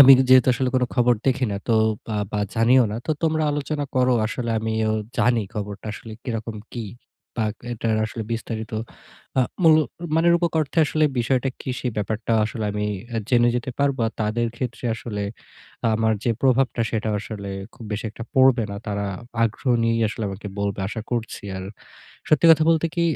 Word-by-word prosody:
আমি 135 0 +11 0.2
যেহেতু 130 -1 +7
আসলে 130 +1 0
কোন 130 - +3
খবর 125 -1 +4
দেখি 130 -1 +2
না - - -2
তো 115 - +4 0.3
বা 110 -2 -3 0.2
বা 105 - 0
জানিও 120 +2 +5
না। - - -3
তো - - -1
তোমরা 160 -1 +2
আলোচনা 145 0 -2
করো। 125 0 +4
আসলে 120 +1 -3
আমিও 110 0 0 0.3
জানি 120 -2 +3
খবরটা 105 0 -5
আসলে 110 +1 -9
কিরকম 115 -2 -4 0.2
কী? 115 -3 -4 0.5
বা 110 - +2 0.3
এ - - -1
এটার 110 -1 0
আসলে 110 +1 -5
বিস্তারিত 110 -1 -4 0.7
আ - - +7 0.2
মুলক 155 -2 +6 0.3
মানে 170 +1 +4
রুপক 170 -1 +1
অর্থে 155 +2 -2
আসলে 155 +1 +1
বিষয়টা 130 +2 +1
কি? 130 - -4
সে - - -3
ব্যাপারটা 110 +2 -2
আসলে 110 0 -4
আমি 105 0 -1 0.4
জেনে 120 -1 +5
যেতে 125 +2 -3
পারবো। 140 -2 +1
আর - - -11
তাদের 115 +2 0
ক্ষেত্রে 125 -1 -5
আসলে 105 -2 -5 0.7
আমার 110 0 +2
যে 120 - +2
প্রভাবটা 130 -2 +2
সেটা 110 -1 -1
আসলে 100 -2 -7 0.3
খুব 115 - -11
বেশি 105 +2 -3
একটা 115 +1 -8
পড়বে 130 -3 +5
না। 100 - -5
তারা 100 -1 -2 0.4
আগ্রহ 115 +4 -1
নিয়েই 115 0 +2
আসলে 110 0 -4
আমাকে 100 +2 -7
বলবে 100 -1 -1
আশা 110 - -4
করছি। 115 -3 -3
আর 95 - -5 0.6
সত্যি 155 +2 +4
কথা 160 -1 +6
বলতে 165 0 +3
কি, 170 - +2
115 Hz, 180 wpm, -23 LUFS, 110-130 Hz, 0.7 s, আমি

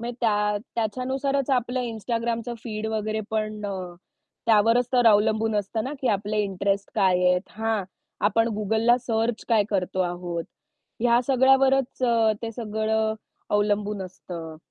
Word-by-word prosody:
म्हणजे 240 0 -5
त्या 210 -2 +2 0.2
त्याच्यानुसारच 260 +4 -1
आपलं 250 0 +1
Instagramचं 230 +1 -3
फीड 220 -2 -4
वगैरे 215 0 -2
पण 215 -1 -2
अ, 185 -3 -5 0.5
त्यावरच 230 +2 +4
तर 245 -2 +4
अवलंबून 215 +1 +3
असतं 210 +3 -2
ना 270 - -4
की 260 - 0
आपले 210 +1 0
इंटरेस्ट 195 0 -1
काय 185 -2 +3
आहेत? 180 0 +3 0.2
हां, 220 -3 0 0.4
आपण 225 +2 +2
Googleला 220 +3 +3
सर्च 225 0 0
काय 220 -3 +4
करतो 185 -1 -1
आहोत? 175 -1 -2 0.6
ह्या 240 +1 +4
सगळ्यावरच 270 0 +3 0.4
ते 230 - -3
सगळं 220 -1 -1 0.4
अवलंबून 205 -1 0
असतं. 170 -3 -8
220 Hz, 130 wpm, -25 LUFS, 205-235 Hz, 0.6 s, त्यावरच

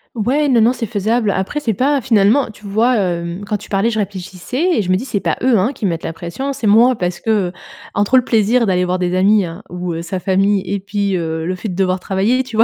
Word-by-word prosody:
Ouais, 260 +7 +1
non, 245 -5 +4
non, 230 - +5
c'est 245 -2 -3
faisable. 215 +1 0
Après 190 +10 -1
c'est 230 -7 -1
pas 275 +6 +1
finalement, 225 +2 +3
tu 210 0 -14
vois, 225 +5 +2
hem, 175 -2 -2
quand 210 +1 -2
tu 205 - -13
parlais, 200 +3 +1
je 220 -2 -2
réfléchissais 195 - -3
et 220 - +3
je 185 - -4
me 185 - +4
dis 190 - -2
c'est 220 -6 -2
pas - - -1
eux, 250 -2 +3
hein, 220 +9 +1
qui - - -12
me 195 - +2
mettent 165 -1 -4
la 165 - -3
pression, 175 +12 -5
c'est 260 -6 -3
moi 235 +5 +5
parce 180 -4 -3
que, 225 - -5 0.2
heu, - - -9 0.4
entre 205 +5 +2
le 255 - +6
plaisir 230 +2 +2
d'aller 180 -2 +1
voir 180 +1 0
des 180 -1 -1
amis, 195 +2 +4
hein, 170 +3 -7
ou, 180 0 -4
heu, 165 - -4
sa 180 +2 -4
famille 195 +1 +2
et 195 +2 -2
puis 200 -1 -1
heu 160 -1 -3
le 185 +2 -2
fait 200 +4 -6
de 180 - -4
devoir 185 -1 0
travailler, 205 +8 0
tu 245 -3 -9
vois? 225 - +5
205 Hz, 270 wpm, -17 LUFS, 185-235 Hz, 0.4 s, le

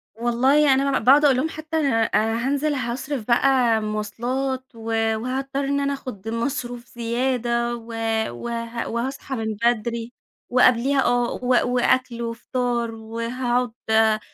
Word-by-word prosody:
والله 260 +5 +3
أنا 270 0 +2
ب - - -9
باقعد 285 +4 +6
أقول 270 -3 +5
لهم 300 +5 0
حتى 315 0 -4
أنا 240 -7 +2
أنا 225 +3 0
هانزِل 285 +2 0
هاصرِف 255 -1 -3
بقى 245 -2 +3
مواصلات 240 +5 -2
و 225 0 -9 0.3
وهاضطر 265 +4 -3
إن 280 +1 0
أنا 280 0 0
آخُذ 225 -6 -7
مصروف 240 0 -3
زيادة 240 0 0
و 230 -1 -10 0.4
وه 230 - -4
وهاصحى 265 +3 -3
من 220 -2 -3
بدري، 235 0 0 0.4
وقبليها، 255 +2 +4
آه 245 0 +2
و 250 0 +1 0.2
وأكل 250 -1 +1
وفطار 235 0 -2
وهاقعد 240 +2 -2 0.2
آآ 220 -1 +4
240 Hz, 135 wpm, -23 LUFS, 230-265 Hz, 0.4 s, باقعد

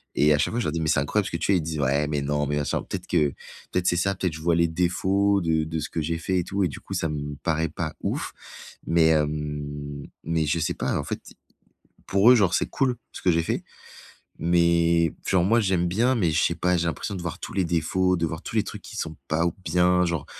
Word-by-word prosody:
et 75 +1 +5
à - - +3
chaque - - +1
fois, 120 - 0
je - - -1
leur 75 - -1
dis: 85 - -1
«Mais 80 - 0
c'est - - +3
incroyable 95 +9 0
ce - - -6
que 85 - -1
tu 85 - -2
fais». 100 - +4
Ils 85 - -1
disent: 80 -1 -4
«Ouais, 70 +2 +1
mais 75 -1 -1
non, 75 +1 0
mais 75 +1 -1
machin». 75 - -1
Peut-être 90 -1 -5
que 75 -5 +2 0.4
peut-être 90 -1 0
c'est - - +3
ça, 100 +2 +1
peut-être 90 -2 -1
que 80 - -6
je - - -10
vois 85 -1 +3
les 85 0 +3
défauts 95 +4 +1
de 80 -2 +1
de 80 0 -3
ce 75 - -4
que 80 - -2
j'ai 80 +2 -1
fait 90 +3 0
et 90 - 0
tout 100 +2 -1
et 90 - +3
du 70 - -8
coup, - - -8
ça 80 - -1
me 75 -1 -4
paraît 80 0 0
pas 80 0 -4
ouf. - - -3 0.5
Mais, 80 -1 +4
hem, 75 -2 -2 0.2
mais 80 -1 0
je 80 +3 0
sais 80 - 0
pas, - - -1
en - - -2
fait, - - -4 0.9
pour 100 +5 +5
eux, - - +8
genre, 95 -6 +3
c'est - - +1
cool 130 -3 0 0.2
ce - - -8
que 90 - +3
j'ai 85 0 +2
fait. - - -2 0.8
Mais 85 -1 +3
genre 90 -2 +3
moi 115 +4 +4
j'aime 90 -3 +1
bien, 115 +8 +2
mais 90 -8 +2
je 80 - +2
sais 85 - +1
pas, 90 +1 +1
j'ai 85 - 0
l'impression 100 +5 -3
de 90 - -5
voir 85 -2 -5
tous - - -7
les 95 - +1
défauts, 90 +2 +1
de 85 - 0
voir 80 +2 -5
tous - - -7
les 105 - +3
trucs - - -8
qui - - -10
sont 80 -1 -4
pas 80 +2 +1
ou 85 - 0
bien, 90 +2 +3
genre 85 -4 -2
85 Hz, 270 wpm, -25 LUFS, 75-90 Hz, 0.9 s, eux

